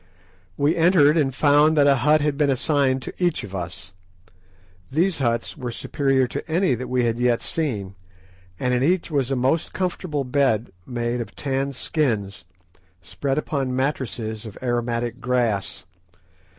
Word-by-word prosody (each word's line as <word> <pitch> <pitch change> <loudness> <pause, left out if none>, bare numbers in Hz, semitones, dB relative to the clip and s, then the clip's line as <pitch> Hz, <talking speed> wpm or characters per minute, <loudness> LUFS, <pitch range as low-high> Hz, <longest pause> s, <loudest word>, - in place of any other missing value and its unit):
We 145 +4 +2
entered, 165 -3 +5
and 150 -5 +2
found 150 +2 +4
that 145 - +5
a 140 -1 +5
hut 150 +4 +3
had 150 -1 0
been 145 -1 +2
assigned 135 -1 +1
to - - -6
each 175 -3 +1
of 100 -2 -9
us. 95 +1 -6 1.0
These 170 +4 +1
huts 115 -3 -1
were 130 -6 -5
superior 135 +2 0
to 125 - -6
any 175 -2 +2
that 125 +1 -4
we 125 -1 +1
had 115 0 -1
yet 120 -1 +2
seen, 110 - -2 0.7
and 125 0 0
in 125 - +1
each 170 +4 +1
was 140 -4 0
a 135 - 0
most 130 +6 0
comfortable 175 -5 -2
bed 125 -4 +1 0.2
made 120 -1 -2
of 115 - -8
tanned 135 -1 -2
skins, 110 - -1 0.6
spread 135 - -3
upon 135 -4 -1
mattresses 115 -5 -2
of 105 - -10
aromatic 120 0 -1
grass. 120 -8 -1
130 Hz, 155 wpm, -23 LUFS, 120-150 Hz, 1.0 s, entered